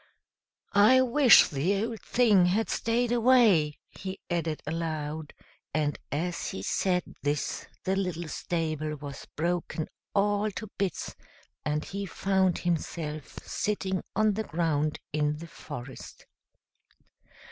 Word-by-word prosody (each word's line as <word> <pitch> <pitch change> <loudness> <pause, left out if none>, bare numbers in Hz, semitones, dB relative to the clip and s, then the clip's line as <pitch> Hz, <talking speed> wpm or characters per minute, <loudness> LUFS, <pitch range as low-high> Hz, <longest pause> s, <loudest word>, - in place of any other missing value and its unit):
"I 215 +6 +7
wish 255 -1 +7
the 185 +8 0
old 230 -2 -6
thing 210 -7 +4
had 210 +5 +1
stayed 235 +1 +1
away," 225 - +5
he 190 0 -6
added 165 -3 -1
aloud, 155 -1 -3 0.4
and 150 -2 0
as 170 +4 -2
he 95 - -5
said 180 - +1 0.2
this 145 +1 -2 0.2
the 190 0 +1
little 180 -4 -2
stable 155 -1 -2
was 140 -1 -8
broken 170 -1 -1 0.3
all 205 +1 +2
to 220 - -5
bits, 195 -2 -2 0.5
and 150 0 -1
he 195 +4 -4
found 190 0 +1
himself 160 -3 -3
sitting 190 -3 -1
on 215 0 +3
the 220 +2 -2
ground 155 -3 0 0.2
in 150 0 +1
the 165 - -8
forest. 135 -6 -9
175 Hz, 120 wpm, -28 LUFS, 155-200 Hz, 0.5 s, I